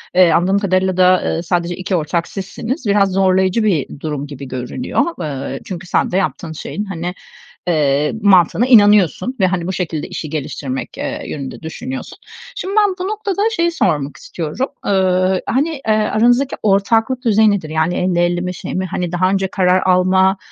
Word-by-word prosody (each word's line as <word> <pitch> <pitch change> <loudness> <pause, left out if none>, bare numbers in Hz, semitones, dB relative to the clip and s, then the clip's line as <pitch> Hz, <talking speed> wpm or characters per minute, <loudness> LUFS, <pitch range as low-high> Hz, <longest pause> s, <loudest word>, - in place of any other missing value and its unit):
eee, 180 -2 +6
anladığım 190 +4 +2
kadarıyla 185 -1 0
da, 185 0 +5
ııı, 165 - -1
sadece 175 0 -1
2 185 +1 -2
ortak 170 +1 -1
sizsiniz, 225 - -5
biraz 200 -1 +3
zorlayıcı 190 +2 +2
bir 160 -8 -1
durum 145 -2 -4
gibi 140 -2 -8
görünüyor. 125 - -2 0.2
Iıı, 135 -2 -4
çünkü 180 -1 -7
sen - - +1
de 185 - +1
yaptığın 185 -3 -2
şeyin, 200 +6 -5
hani, 180 -2 -4 0.5
eee, 150 -3 +2
mantığına 195 +3 +4
inanıyorsun 205 - +5 0.2
ve 190 - +4
hani 180 -1 -2
bu 190 - -2
şekilde 160 -4 -3
işi 155 - -6
geliştirmek, 135 -3 -5
ııı, - - -4
yönünde 140 0 -6
düşünüyorsun. 250 - -7 0.4
Şimdi 390 +2 -4
ben 405 -3 +3
bu 370 - -2
noktada 410 -2 -2
şeyi 340 0 +1
sormak 145 - -1
istiyorum, 170 - -4 0.2
ııı, 185 -1 +2
hani, 285 +6 +1
eee, 270 -8 -1
aranızdaki 240 +5 +2
ortaklık 225 +5 +2
düzeyi 220 -1 +4
nedir? 180 -7 -2
Yani 160 +2 0
50-50 175 -1 +1
mi 180 0 -3
şey - - -6
mi? 185 0 -1
Hani 175 -1 -3
daha 185 +1 +1
önce 195 0 0
karar 185 -1 +2
alma, 190 +1 +3
185 Hz, 170 wpm, -17 LUFS, 170-210 Hz, 0.5 s, eee